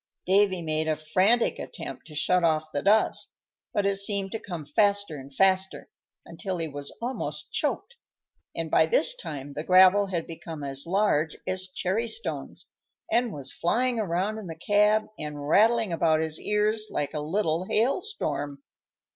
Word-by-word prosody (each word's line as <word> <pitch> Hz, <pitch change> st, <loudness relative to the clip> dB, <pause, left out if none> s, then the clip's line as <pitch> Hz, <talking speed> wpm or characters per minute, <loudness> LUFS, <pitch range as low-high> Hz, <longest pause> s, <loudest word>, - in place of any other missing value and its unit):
Davy 190 Hz, -2 st, +3 dB
made 155 Hz, 0 st, 0 dB
a 155 Hz, -, +1 dB
frantic 185 Hz, +10 st, +2 dB
attempt -, -, -7 dB
to 155 Hz, -, -11 dB
shut 180 Hz, +4 st, +2 dB
off 155 Hz, -1 st, +1 dB
the 145 Hz, -, -1 dB
dust, 210 Hz, +3 st, +2 dB, 0.4 s
but 205 Hz, -, 0 dB
it 200 Hz, 0 st, +2 dB
seemed 200 Hz, -1 st, +1 dB
to 225 Hz, -, -3 dB
come 175 Hz, -8 st, -7 dB
faster 200 Hz, +2 st, +1 dB
and 135 Hz, +1 st, -11 dB
faster, 190 Hz, +4 st, +1 dB, 0.4 s
until 190 Hz, -4 st, -5 dB
he 165 Hz, -1 st, -2 dB
was 145 Hz, -1 st, -7 dB
almost 255 Hz, +2 st, -4 dB
choked, 485 Hz, -, -2 dB, 0.6 s
and -, -, -4 dB
by -, -, +4 dB
this -, -, +3 dB
time 145 Hz, -, -7 dB
the 150 Hz, +2 st, -5 dB
gravel 185 Hz, +3 st, +6 dB
had 175 Hz, -4 st, -3 dB
become 165 Hz, -2 st, -8 dB
as 140 Hz, +2 st, -4 dB
large 170 Hz, -5 st, +1 dB
as 185 Hz, 0 st, -3 dB
cherry 190 Hz, +5 st, -2 dB
stones, 460 Hz, -, -5 dB, 0.4 s
and 240 Hz, -1 st, +2 dB
was 140 Hz, -5 st, -4 dB
flying 240 Hz, +7 st, 0 dB
around 200 Hz, +2 st, -1 dB
in 205 Hz, -, -8 dB
the 165 Hz, -, -6 dB
cab 210 Hz, +5 st, +3 dB
and 150 Hz, -1 st, -5 dB
rattling 220 Hz, +3 st, +3 dB
about 160 Hz, -1 st, +2 dB
his 160 Hz, 0 st, -2 dB
ears 215 Hz, +1 st, +1 dB
like 145 Hz, -, -2 dB
a 150 Hz, -, -2 dB
little 165 Hz, +2 st, -1 dB
hail 235 Hz, -, +1 dB
storm. 145 Hz, -, -4 dB
185 Hz, 165 wpm, -26 LUFS, 155-210 Hz, 0.6 s, gravel